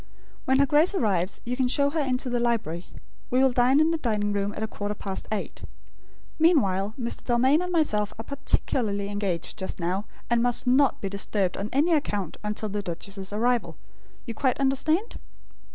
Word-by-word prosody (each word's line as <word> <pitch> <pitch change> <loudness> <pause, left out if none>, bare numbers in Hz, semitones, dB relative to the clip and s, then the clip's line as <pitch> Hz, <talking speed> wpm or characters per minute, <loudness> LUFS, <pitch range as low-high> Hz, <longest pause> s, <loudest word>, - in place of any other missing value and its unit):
When 265 0 +3
her 280 - +5
Grace 310 +7 +3
arrives, 195 - 0
you 245 +1 -2
can 255 -1 +1
show 280 +2 +2
her 320 - -1
into 260 -2 -1
the 245 -1 0
library. 220 -8 -1 0.4
We 250 - +1
will 265 0 +5
dine 250 +3 +4
in 315 +1 +4
the 330 - -1
dining 210 -5 0
room 200 0 -1
at - - -5
a - - -1
quarter 205 -1 -4
past 195 -1 -4
eight. 215 - -4 0.8
Meanwhile, 215 - +3
Mr. 235 -1 -3
Dalmain 260 +6 +3
and 360 0 -3
myself 215 - +1
are 225 - -6
particularly 220 -7 -1
engaged 195 -4 -3
just 190 - -4
now, 185 +4 -1 0.2
and 235 -1 +2
must 245 +1 0
not 260 +2 +3
be 195 - -2
disturbed 200 -1 -1
on 200 +2 -4
any 300 +6 +3
account, 205 - -1
until 210 0 -2
the 205 +1 -2
duchess's 195 +2 -4
arrival. 235 +3 0 0.5
You 235 - -5
quite 255 +3 0
understand?" 310 - +1
235 Hz, 185 wpm, -26 LUFS, 200-270 Hz, 0.8 s, her